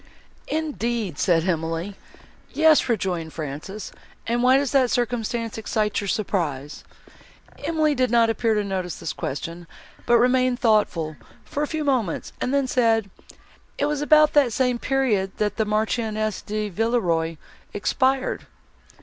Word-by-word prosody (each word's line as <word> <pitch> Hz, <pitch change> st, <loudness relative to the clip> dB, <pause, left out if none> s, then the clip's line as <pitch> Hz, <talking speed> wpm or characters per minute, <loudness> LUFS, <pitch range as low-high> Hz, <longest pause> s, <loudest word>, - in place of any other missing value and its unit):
"Indeed!" 235 Hz, -, -2 dB
said 170 Hz, -1 st, +2 dB
Emily. 165 Hz, +3 st, -2 dB, 0.5 s
"Yes," 315 Hz, -4 st, +4 dB
rejoined 180 Hz, -7 st, -1 dB
Frances, 155 Hz, +7 st, -6 dB, 0.3 s
"and 235 Hz, +1 st, 0 dB
why 255 Hz, +2 st, +5 dB
does 280 Hz, -1 st, 0 dB
that 265 Hz, -3 st, +3 dB
circumstance 235 Hz, -2 st, -1 dB
excite 215 Hz, -1 st, -1 dB
your 200 Hz, -, -5 dB
surprise?" 160 Hz, -, -2 dB, 0.8 s
Emily 310 Hz, -2 st, +1 dB
did 255 Hz, -2 st, +1 dB
not 230 Hz, 0 st, +4 dB
appear 225 Hz, 0 st, +1 dB
to 210 Hz, -, +1 dB
notice 185 Hz, -3 st, -3 dB
this 155 Hz, -, -5 dB
question, 165 Hz, +5 st, -5 dB, 0.4 s
but 240 Hz, -, +6 dB
remained 255 Hz, +1 st, +3 dB
thoughtful, 205 Hz, -, +1 dB, 0.3 s
for 290 Hz, -, -4 dB
a 300 Hz, -, 0 dB
few 315 Hz, 0 st, -3 dB
moments, 255 Hz, -, -1 dB
and 250 Hz, -, 0 dB
then 280 Hz, -1 st, +2 dB
said, 225 Hz, -5 st, +1 dB, 0.7 s
"It 285 Hz, -, +1 dB
was 295 Hz, 0 st, -1 dB
about 305 Hz, 0 st, +5 dB
that 280 Hz, -5 st, +4 dB
same 250 Hz, -1 st, +1 dB
period 230 Hz, -9 st, 0 dB
that 210 Hz, -1 st, -1 dB
the 220 Hz, -, +1 dB
Marchioness 215 Hz, 0 st, -1 dB
de 210 Hz, 0 st, -3 dB
Villeroi 175 Hz, -7 st, 0 dB, 0.3 s
expired." 260 Hz, +5 st, 0 dB
225 Hz, 140 wpm, -23 LUFS, 190-255 Hz, 0.8 s, but